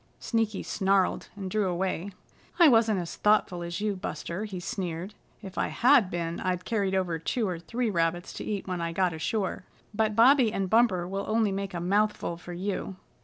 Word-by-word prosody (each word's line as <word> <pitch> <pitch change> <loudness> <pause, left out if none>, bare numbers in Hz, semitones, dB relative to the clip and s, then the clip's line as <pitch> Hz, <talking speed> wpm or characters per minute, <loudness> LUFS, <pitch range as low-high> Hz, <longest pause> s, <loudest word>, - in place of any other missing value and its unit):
Sneaky 225 -3 -1
snarled 195 -2 +1
and 195 -2 -5
drew 210 -1 +1
away. 185 +1 -2 0.5
"I 340 - +8
wasn't 225 -5 +4
as 170 -1 -5
thoughtful 210 -4 +2
as 170 +1 -4
you, 210 -1 0
Buster," 185 +1 -5
he 195 -4 -6
sneered. 185 -1 -4 0.3
"If 195 -1 -6
I - - +1
had 245 -5 +4
been 170 -1 -3
I'd 180 -1 -2
carried 200 -4 0
over 175 -3 0
two 220 +7 -1
or 175 -3 -3
three 230 +7 -2
rabbits 175 0 -1
to - - -6
eat 205 -3 -4
when 180 -2 -3
I 170 0 -2
got 180 0 +1
ashore. 185 +5 -2 0.3
But 215 0 +1
Bobby 245 0 +6
and 195 -3 -2
Bumper 215 -7 +3
will 195 +2 -3
only 220 -1 +2
make 195 -1 -4
a - - -2
mouthful 200 0 0
for 175 +1 -10
you." 190 +1 -3
195 Hz, 190 wpm, -28 LUFS, 175-215 Hz, 0.5 s, I